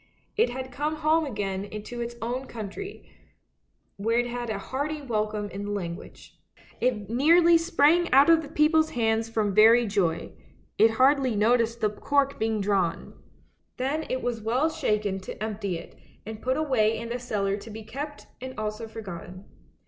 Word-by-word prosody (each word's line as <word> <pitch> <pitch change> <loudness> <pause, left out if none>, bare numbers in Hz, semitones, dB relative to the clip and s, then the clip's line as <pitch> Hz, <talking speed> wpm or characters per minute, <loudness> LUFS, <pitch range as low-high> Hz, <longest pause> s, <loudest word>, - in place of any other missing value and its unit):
It 450 - +3
had 260 +1 -6
come 300 +4 -2
home 310 0 +2
again 200 -4 -3
to 240 +2 -6
its 235 0 -5
own 250 +3 -3
country, 230 - -7 0.9
where 225 +4 0
it 240 - +2
had 240 -1 -4
a 215 - -2
hearty 285 +8 -3
welcome 215 -5 -2
in 200 +2 -5
the - - -5
language. 185 -3 -7 0.4
It 230 -5 0
nearly 330 +8 +5
sprang 330 +1 +3
out 275 +3 +7
of 330 -1 +6
the 305 - -8
people's 315 +1 +3
hands 225 -1 0
from 215 -3 0
very 225 +4 +6
joy; 195 -6 -1 0.5
it 225 - +7
hardly 265 -2 +4
noticed 230 +2 +2
the 215 - +3
cork 280 +5 0
being 220 -1 0
drawn. 195 -4 0 0.6
Then 280 +5 -2
it 255 0 -2
was 235 -2 -2
well 255 +9 +1
shaken 210 -10 -1
to 190 - -8
empty 205 -4 -3
it, - - -12 0.3
and 220 0 -7
put 260 +1 0
away 235 -8 +2
in 230 +1 -6
the 245 +1 -3
cellar 200 -5 -1
to 210 +2 -10
be 220 +1 -8
kept 290 +7 -7 0.2
and 260 0 -7
also 215 +1 -4
for 225 0 -8
gotten. 185 -1 -9
230 Hz, 170 wpm, -26 LUFS, 210-275 Hz, 0.9 s, out